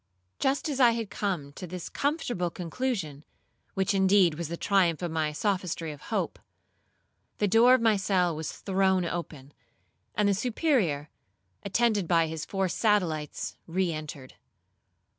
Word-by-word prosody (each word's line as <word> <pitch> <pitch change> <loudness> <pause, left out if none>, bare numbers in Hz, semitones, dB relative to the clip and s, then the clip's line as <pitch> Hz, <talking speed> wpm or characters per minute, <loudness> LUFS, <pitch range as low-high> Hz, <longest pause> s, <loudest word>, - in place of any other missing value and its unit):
Just 270 +3 +1
as 280 -3 -2
I 240 -3 +6
had 230 -3 -4
come 170 -9 -3
to 180 - -8
this 180 0 -6
comfortable 250 - -1
conclusion, 175 - -3 0.5
which 190 +1 +1
indeed 190 -3 +4
was 165 +1 -4
the 170 +2 -5
triumph 180 -4 +2
of 170 -2 -2
the 155 -2 0
sophistry 180 -3 -1
of 145 - -11
hope, - - -2 1.0
the 205 - +1
door 235 +5 +6
of 255 - 0
my 225 -2 +4
cell 185 -3 +1
was 155 -1 -4
thrown 190 -2 +1
open, 155 -5 -6 0.6
and 210 -1 +2
the 200 - +3
Superior, 215 - 0 0.5
attended 210 -2 +1
by 165 -1 +4
his 160 -1 -5
four 195 -1 0
satellites 175 -7 0
re 175 0 0
entered. 150 -4 -7
185 Hz, 145 wpm, -28 LUFS, 160-210 Hz, 1.0 s, I